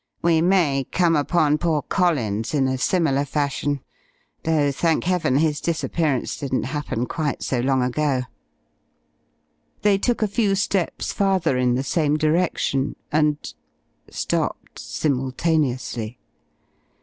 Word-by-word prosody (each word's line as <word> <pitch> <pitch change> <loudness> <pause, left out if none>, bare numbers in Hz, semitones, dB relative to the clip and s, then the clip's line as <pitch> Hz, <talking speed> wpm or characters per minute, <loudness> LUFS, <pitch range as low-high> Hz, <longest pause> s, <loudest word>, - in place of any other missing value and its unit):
We 165 -1 +3
may 160 -7 +2
come 170 -3 +3
upon 150 0 +2
poor 160 -3 0
Collins 125 - 0
in 135 -2 +2
a 130 0 -1
similar 145 -4 +2
fashion 145 -1 -1 0.6
though 155 -3 +2
thank 160 +3 +1
Heaven 170 -7 +1
his 150 -1 +1
disappearance 160 -4 -1
didn't 135 -2 -2
happen 135 -4 -3
quite 150 +1 -3
so 130 - -1
long 130 +1 +2
ago." 130 0 0 1.6
They 205 -2 +4
took 240 +1 0
a - - +2
few 205 -1 +1
steps 195 -2 -1
farther 190 -7 +1
in 125 -1 +2
the 130 - -1
same 150 +2 +1
direction 155 -3 0 0.2
and 150 -1 +2 0.7
stopped - - -3
simultaneously. 130 -4 -1
150 Hz, 120 wpm, -23 LUFS, 135-170 Hz, 1.6 s, They